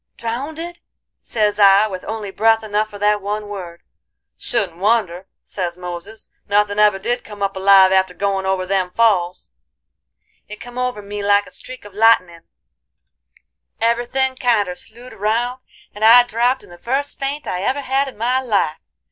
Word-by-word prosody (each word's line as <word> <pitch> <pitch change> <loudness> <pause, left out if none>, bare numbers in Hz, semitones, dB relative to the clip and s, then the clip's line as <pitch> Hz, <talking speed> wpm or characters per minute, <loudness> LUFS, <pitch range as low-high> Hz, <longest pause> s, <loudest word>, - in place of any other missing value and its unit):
"'Drownded?' 310 +9 -5 0.4
sez 210 -2 -1
I, 200 +1 +6
with 190 -4 -6
only 215 -3 -5
breath 225 +2 +2
enough 215 0 -1
for 205 - -10
that 210 0 +1
one 210 +1 -4
word. 180 -4 -8 0.5
'Shouldn't 200 -8 -2
wonder,' 190 -3 0 0.2
sez 175 -3 -4
Moses, 180 +5 -8 0.2
'nothin' 205 0 +1
ever 210 -2 +5
did 240 +5 -2
come 205 -1 -7
up 195 0 -1
alive 190 0 +6
after 190 -1 +2
goin' 195 0 -1
over 190 -1 0
them 190 -1 0
falls.' 185 - +1 1.0
"It 210 - -8
come 245 +1 -8
over 250 -4 -2
me 205 +1 -6
like 205 0 +3
a - - -14
streak 255 -4 -9
of 205 - -12
lightenin'; 190 -6 +3 1.3
every 235 +1 +1
thin' 265 +1 0
kinder 215 -8 +1
slewed 235 +7 -9
round, 235 +5 -1 0.3
and 205 - -6
I 235 +2 +8
dropped 245 +2 0
in - - -17
the 175 - -13
first 275 +4 -3
faint 280 +2 -3
I 180 - -3
ever 265 +8 -1
had 270 +1 0
in 265 - -9
my 250 +4 +1
life. 205 -11 0
210 Hz, 165 wpm, -19 LUFS, 195-240 Hz, 1.3 s, I